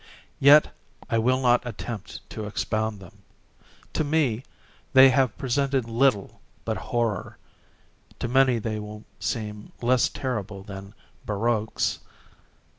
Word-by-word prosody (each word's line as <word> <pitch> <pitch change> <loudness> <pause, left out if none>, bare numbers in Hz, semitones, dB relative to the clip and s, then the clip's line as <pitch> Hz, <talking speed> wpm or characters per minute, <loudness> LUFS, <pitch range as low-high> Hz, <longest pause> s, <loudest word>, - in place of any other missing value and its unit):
Yet 145 +2 +7 0.4
I 115 - +3
will 130 +3 +2
not 125 -2 +4
attempt 115 -3 -7
to 110 -1 -5
expound 110 0 -2
them. 95 +2 -14 0.7
To - - 0
me, 145 -6 +1 0.5
they 130 0 +9
have 130 -3 +2
presented 135 -1 0
little 115 -3 +1 0.2
but - - -1
horror—to 115 +1 -5
many 130 0 +4
they 110 -1 -3
will 105 0 -8 0.2
seem 105 -2 -4
less 125 +1 +3
terrible 105 -7 -4
than 100 +1 -9 0.3
barroques. 110 +1 0
115 Hz, 115 wpm, -25 LUFS, 105-130 Hz, 0.7 s, they